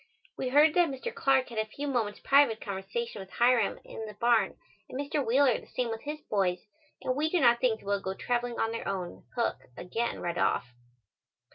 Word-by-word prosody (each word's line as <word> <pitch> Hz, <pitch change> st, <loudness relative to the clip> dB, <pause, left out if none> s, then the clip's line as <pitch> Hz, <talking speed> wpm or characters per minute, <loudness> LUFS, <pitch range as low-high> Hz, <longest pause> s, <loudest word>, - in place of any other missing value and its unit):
We 255 Hz, -, -2 dB
heard 295 Hz, +3 st, +6 dB
that 350 Hz, -2 st, +4 dB
Mr. 275 Hz, -, -5 dB
Clark 270 Hz, -, +2 dB
had 230 Hz, -2 st, -4 dB
a 220 Hz, -, +1 dB
few 280 Hz, +7 st, -5 dB
moments' 230 Hz, -6 st, -1 dB
private 275 Hz, -5 st, +4 dB
conversation 200 Hz, +3 st, -4 dB
with 190 Hz, -, -10 dB
Hiram 240 Hz, -3 st, +3 dB
in 220 Hz, -, -7 dB
the 210 Hz, -, -9 dB
barn 230 Hz, -2 st, +2 dB, 0.3 s
and 260 Hz, -, -5 dB
Mr. 285 Hz, 0 st, -1 dB
Wheeler 255 Hz, +1 st, +3 dB
the -, -, -16 dB
same 245 Hz, -2 st, -2 dB
with 225 Hz, 0 st, -4 dB
his 300 Hz, +1 st, -5 dB
boys 185 Hz, -3 st, -1 dB, 0.4 s
and 255 Hz, -, 0 dB
we 305 Hz, +3 st, +1 dB
do 355 Hz, -, +2 dB
not 240 Hz, -4 st, +5 dB
think 235 Hz, -3 st, +1 dB
they -, -, -17 dB
will 200 Hz, 0 st, 0 dB
go 190 Hz, 0 st, -3 dB
traveling 240 Hz, +2 st, -2 dB
on 225 Hz, -, +1 dB
their 230 Hz, -, -4 dB
own 185 Hz, -3 st, -4 dB
hook 235 Hz, -2 st, 0 dB, 0.2 s
again 230 Hz, +6 st, -2 dB
right 175 Hz, 0 st, -3 dB
off. 120 Hz, -1 st, 0 dB
235 Hz, 210 wpm, -29 LUFS, 205-270 Hz, 0.4 s, heard